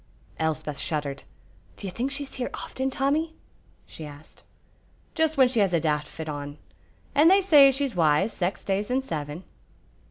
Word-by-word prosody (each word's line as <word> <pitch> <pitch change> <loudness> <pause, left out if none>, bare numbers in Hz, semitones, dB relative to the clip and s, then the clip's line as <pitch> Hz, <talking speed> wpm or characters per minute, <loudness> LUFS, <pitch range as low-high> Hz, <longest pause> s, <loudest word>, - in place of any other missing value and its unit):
Elspeth 155 -2 -2
shuddered. 145 -3 -3 0.5
"Do - - -8
you 190 - -4
think 245 +8 -2
she's 275 0 -4
here 250 -2 -3
often, 265 0 -3
Tommy?" 295 +5 0 0.5
she 160 - -10
asked. 145 0 -12 0.7
"Just 320 -2 +1
when 260 -2 +7
she 245 -2 0
has 195 -3 +2
a 170 - +4
daft 150 -2 0
fit 160 -1 -8
on, 145 -1 -5 0.6
and 300 +4 +6
they 385 +2 +6
say 295 -7 +7
she's 270 -1 -1
wise 170 +4 +2
sax 180 +1 -2
days 200 +2 -1
in 260 +1 +1
seven." 155 - -5
195 Hz, 165 wpm, -26 LUFS, -, 0.7 s, when